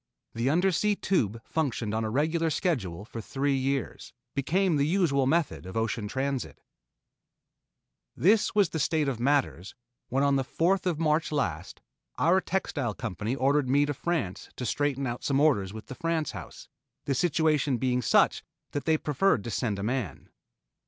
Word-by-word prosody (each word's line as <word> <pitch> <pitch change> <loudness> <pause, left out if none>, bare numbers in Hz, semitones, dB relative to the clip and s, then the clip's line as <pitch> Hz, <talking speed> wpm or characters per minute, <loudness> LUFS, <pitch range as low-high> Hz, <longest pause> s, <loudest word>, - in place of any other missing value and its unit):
The 115 +3 0
Undersea 190 +5 +2
Tube 115 - 0
functioned 125 -9 -2
on 110 +1 0
regular 160 +7 +1
schedule 105 - -2
for 115 0 -7
three 140 +5 -1
years, 135 +1 -2 0.2
became 170 +5 +1
the 140 +1 +2
usual 155 -7 +2
method 160 - 0
of 95 - -6
ocean 115 -1 -1
transit. 135 +3 -3 1.6
This 210 +5 +3
was 200 -5 +4
the 160 - -3
state 155 0 +1
of 130 -4 -2
matters, 130 - 0 0.3
when 135 +2 +1
on 140 -1 +3
the 135 - 0
fourth 180 +7 +1
of 170 -4 0
March 155 0 +1
last, 95 - -3 0.4
our 185 +3 +3
textile 145 - -2
company 110 +2 -3
ordered 135 0 +2
me 145 +2 +4
to 145 - -2
France 140 - -3
to 125 - -5
straighten 140 +2 0
out 120 -1 -4
some 135 -1 +1
orders 115 -11 +3
with 110 +1 -9
the - - -8
France 165 +1 -1
house, - - -10 0.4
the 140 - 0
situation 150 -2 +2
being 125 0 0
such - - +3 0.3
that 145 -2 -3
they 160 -1 +3
preferred 150 - +1
to 115 - -5
send 110 -3 -1
a 100 - -4
man. 115 - -3
140 Hz, 165 wpm, -28 LUFS, 120-160 Hz, 1.6 s, was